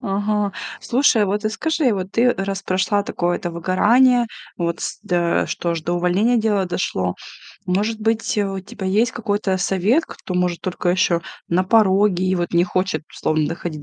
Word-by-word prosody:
Ага. 205 Hz, -1 st, -1 dB, 0.3 s
Слушай, 240 Hz, -4 st, +3 dB
вот 205 Hz, +2 st, -2 dB
и -, -, +2 dB
скажи, 290 Hz, +3 st, 0 dB
вот 190 Hz, -1 st, -5 dB
ты 245 Hz, +1 st, +3 dB
раз 195 Hz, 0 st, -3 dB
прошла 185 Hz, +2 st, +1 dB
такое, 175 Hz, -3 st, -1 dB
это 175 Hz, -, -4 dB
выгорание, 235 Hz, +9 st, +3 dB, 0.3 s
вот 170 Hz, -1 st, -2 dB
с -, -, -4 dB
да, 175 Hz, -1 st, +1 dB
что 170 Hz, -, -3 dB
аж 165 Hz, -1 st, -2 dB
до 170 Hz, +3 st, -2 dB
увольнения 180 Hz, +7 st, +2 dB
дело 215 Hz, -3 st, +1 dB
дошло. 95 Hz, -, -2 dB, 0.5 s
Может 210 Hz, +5 st, 0 dB
быть, 225 Hz, +1 st, 0 dB
у 195 Hz, -2 st, -1 dB
тебя 190 Hz, +1 st, -7 dB
есть 215 Hz, +5 st, +2 dB
какой-то 205 Hz, -4 st, -1 dB
совет, 195 Hz, -, +1 dB
кто, 185 Hz, -, -8 dB
может, 180 Hz, -1 st, 0 dB
только 180 Hz, -1 st, -1 dB
еще 175 Hz, -2 st, +2 dB, 0.3 s
на 180 Hz, +2 st, +2 dB
пороге 195 Hz, -2 st, +3 dB
и 185 Hz, -, +2 dB
вот 175 Hz, -1 st, -2 dB
не 170 Hz, 0 st, +4 dB
хочет, 185 Hz, -3 st, -1 dB
словом, 155 Hz, -1 st, 0 dB
доходить 165 Hz, -2 st, -5 dB
190 Hz, 175 wpm, -20 LUFS, 175-215 Hz, 0.5 s, не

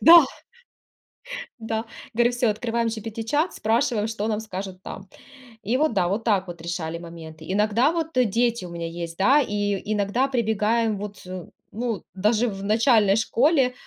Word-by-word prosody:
Да! 335 Hz, -2 st, +10 dB, 1.4 s
Да. 225 Hz, 0 st, -3 dB, 0.3 s
Говорю 240 Hz, +1 st, +3 dB
всё, 245 Hz, -2 st, +1 dB
открываем 230 Hz, +2 st, -1 dB
GPT-чат, 225 Hz, -, -1 dB
спрашиваем, 220 Hz, 0 st, +1 dB
что 220 Hz, -1 st, -3 dB
нам 215 Hz, -1 st, 0 dB
скажут 190 Hz, -3 st, -6 dB
там. 195 Hz, -, -8 dB, 0.6 s
И 235 Hz, +6 st, +1 dB
вот 310 Hz, +2 st, +2 dB
да, 175 Hz, -, +2 dB
вот 205 Hz, +5 st, -1 dB
так 195 Hz, -5 st, +2 dB
вот 170 Hz, -2 st, -8 dB
решали 170 Hz, -1 st, -3 dB
моменты. 160 Hz, -2 st, -10 dB
Иногда 215 Hz, +8 st, +3 dB
вот, 325 Hz, -3 st, -3 dB
э, 250 Hz, -, +5 dB
дети 230 Hz, -1 st, +1 dB
у -, -, -8 dB
меня 170 Hz, -1 st, -4 dB
есть, 170 Hz, 0 st, -6 dB
да, 270 Hz, +10 st, +5 dB
и, 205 Hz, -4 st, 0 dB
и 215 Hz, -, -3 dB
иногда 210 Hz, +6 st, +1 dB
прибегаем, 220 Hz, -3 st, +1 dB
вот, 205 Hz, 0 st, -7 dB, 0.5 s
ну, 230 Hz, 0 st, -3 dB
даже 215 Hz, +5 st, +2 dB
в 195 Hz, -2 st, -5 dB
начальной 215 Hz, -1 st, +4 dB
школе, 255 Hz, +3 st, +3 dB
220 Hz, 160 wpm, -24 LUFS, 195-235 Hz, 1.4 s, Да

